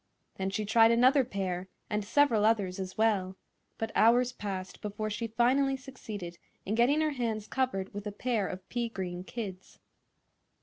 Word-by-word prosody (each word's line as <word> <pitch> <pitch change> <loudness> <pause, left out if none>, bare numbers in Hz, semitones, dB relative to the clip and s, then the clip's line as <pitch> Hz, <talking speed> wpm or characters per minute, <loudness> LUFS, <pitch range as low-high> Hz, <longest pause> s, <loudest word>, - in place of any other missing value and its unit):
Then 190 0 -1
she 210 +2 -2
tried 225 +2 +6
another 255 +4 +5
pair, 190 -5 -3 0.2
and 210 0 -1
several 230 0 +3
others, 205 -4 +2
as 185 -1 -5
well; 195 -4 +1 0.4
but 225 0 -3
hours 240 +2 +4
passed 190 -5 -6
before 215 +1 -3
she 230 +3 -2
finally 260 +4 +2
succeeded 215 -10 -8 0.3
in 205 - -1
getting 250 +7 +3
her 310 -1 +1
hands 230 -6 -2
covered 220 -7 -2
with 205 +1 -5
a - - -3
pair 220 -2 -1
of 185 0 -7
pea 240 -1 -2
green 180 -4 -5
kids. 190 -3 -7
215 Hz, 165 wpm, -30 LUFS, 195-240 Hz, 0.4 s, tried